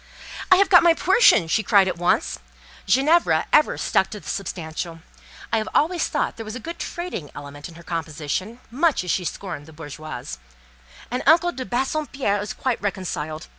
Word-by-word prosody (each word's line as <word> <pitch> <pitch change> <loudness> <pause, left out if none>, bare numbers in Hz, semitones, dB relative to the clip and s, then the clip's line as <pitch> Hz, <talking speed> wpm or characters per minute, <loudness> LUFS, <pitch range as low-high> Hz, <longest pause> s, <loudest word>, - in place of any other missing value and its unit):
"I 370 - +8
have 395 +1 +4
got 355 - +7
my 335 -1 +5
portion!" 375 - +5
she 220 - +2
cried 200 -2 +4
at 185 - -1
once; 175 - +1 0.5
(Ginevra 285 - +3
ever 300 - +4
stuck 190 - +1
to 210 - -7
the - - -15
substantial; 165 -3 -5 0.5
I 225 - +3
always 340 +3 +2
thought - - -2
there 225 - -6
was 215 +1 -7
a - - -5
good 335 +7 -7
trading 345 - -5
element 145 +2 -9
in 165 - -14
her 170 - -13
composition, 165 - -4
much 300 - +1
as 180 - -2
she 180 - -1
scorned 165 -5 -6
the 160 - -14
"bourgeoise;") 150 - -8 0.7
"and 250 - -1
uncle 345 +3 +5
de 260 -6 -6
Bassompierre 265 -4 -1
is 205 - -5
quite 255 -3 -2
reconciled. 175 -6 -4
205 Hz, 175 wpm, -23 LUFS, -, 0.7 s, I